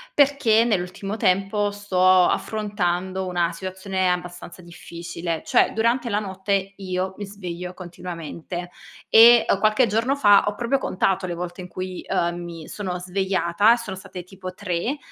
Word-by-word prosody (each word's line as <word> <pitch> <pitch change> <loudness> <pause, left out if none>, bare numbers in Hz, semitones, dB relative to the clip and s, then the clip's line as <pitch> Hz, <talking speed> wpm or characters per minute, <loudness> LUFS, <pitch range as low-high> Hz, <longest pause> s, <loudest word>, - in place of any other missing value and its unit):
perché 270 -6 +4
nell'ultimo 195 0 -2
tempo 200 0 +1
sto 185 -2 +3
affrontando 190 -3 -2
una 175 -1 0
situazione 185 +1 -2
abbastanza 180 0 -6
difficile, 170 -1 -6
cioè - - +3
durante 235 +2 +1
la 205 - 0
notte 195 0 -2
io 185 -1 -3
mi 205 - -5
sveglio 180 -3 -7
continuamente. 175 0 -7 0.4
E, 235 +1 +8
uhm, 195 - +2
qualche 215 +4 +3
giorno 230 +6 +1
fa 205 -8 +5
ho 205 - -1
proprio 240 +5 0
contato 190 -4 0
le 175 - -4
volte 175 +1 -6
in 180 - -8
cui, 185 0 -6
uhm, 170 0 +1
mi 165 -2 -8
sono 185 -4 -4
svegliata 190 +2 +2
e - - 0
sono 225 -5 -6
state 185 -1 -9
tipo 185 0 -9
3, 180 -4 -2
mi 265 +10 -2
190 Hz, 155 wpm, -23 LUFS, 180-205 Hz, 0.4 s, E